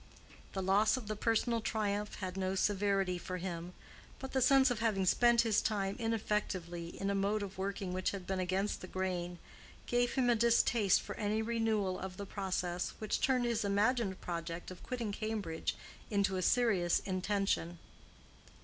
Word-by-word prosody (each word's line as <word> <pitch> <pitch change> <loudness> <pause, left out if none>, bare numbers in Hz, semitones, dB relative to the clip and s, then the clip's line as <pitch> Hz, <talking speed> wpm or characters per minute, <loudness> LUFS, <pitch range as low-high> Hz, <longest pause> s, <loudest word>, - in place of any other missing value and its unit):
The 190 - -2
loss 205 +5 +4
of 240 -5 -7
the 215 - -2
personal 230 +2 +1
triumph 210 -1 -1
had 185 -1 -5
no 190 0 -1
severity 195 -2 +1
for 185 +1 -5
him, 175 -1 -5 0.4
but 265 - -7
the 265 - +1
sense 265 +1 +5
of 240 - -1
having 215 -4 +1
spent 235 +5 +5
his 225 -3 +2
time 200 -2 -1
ineffectively 200 -7 -2
in 195 0 0
a - - +1
mode 200 +2 +1
of 195 -1 -7
working 195 -1 -3
which 185 0 0
had 195 -3 -6
been 190 0 -2
against 190 +3 -1
the 185 - -7
grain, 180 -2 -3 0.5
gave 245 0 +1
him 260 -2 +2
a 240 - +5
distaste 230 -3 +3
for - - -6
any 215 +1 0
renewal 220 -5 0
of 190 -1 -6
the 200 - -5
process, 185 -3 -2
which 215 -1 -2
turned 255 -2 +2
his 235 -3 0
imagined 205 0 +1
project 170 0 -5
of 180 - -10
quitting 240 -5 -3
Cambridge 210 -6 -3 0.3
into 200 -2 +1
a 185 - -1
serious 190 -5 +3
intention. 190 -2 -1
200 Hz, 170 wpm, -34 LUFS, 185-225 Hz, 0.5 s, sense